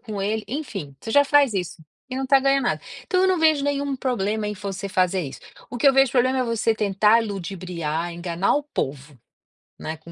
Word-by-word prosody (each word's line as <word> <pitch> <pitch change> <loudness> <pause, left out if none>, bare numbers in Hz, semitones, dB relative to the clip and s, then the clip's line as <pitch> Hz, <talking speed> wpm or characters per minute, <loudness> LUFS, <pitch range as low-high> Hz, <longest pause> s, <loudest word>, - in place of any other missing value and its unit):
com 210 -3 -6
ele”, 215 +2 -1
enfim, 210 - -5
você 225 - -6
já 285 0 +6
faz 280 -4 +4
isso 180 -4 -3 0.3
e 255 - -4
não 270 - -2
está 275 +1 +5
ganhando 275 -1 +2
nada. - - 0 0.3
Então 370 0 +2
eu 380 - +4
não 370 -2 +2
vejo 315 -3 +3
nenhum 285 -1 -1
problema 215 -5 -1
em 210 - -3
você 200 0 -5
fazer 185 0 +1
isso. 135 - -8 0.3
O 240 - -5
que 280 - +2
eu - - +5
vejo 270 -2 +5
problema 260 +1 +2
é 255 - +1
você 230 -1 0
tentar 210 +2 +3
ludibriar, 175 -5 -4
enganar 175 +2 -1
o 295 - -1
povo, 140 +1 -4 0.6
né, 155 - -5
com 165 +2 -14
215 Hz, 215 wpm, -23 LUFS, 185-270 Hz, 0.6 s, já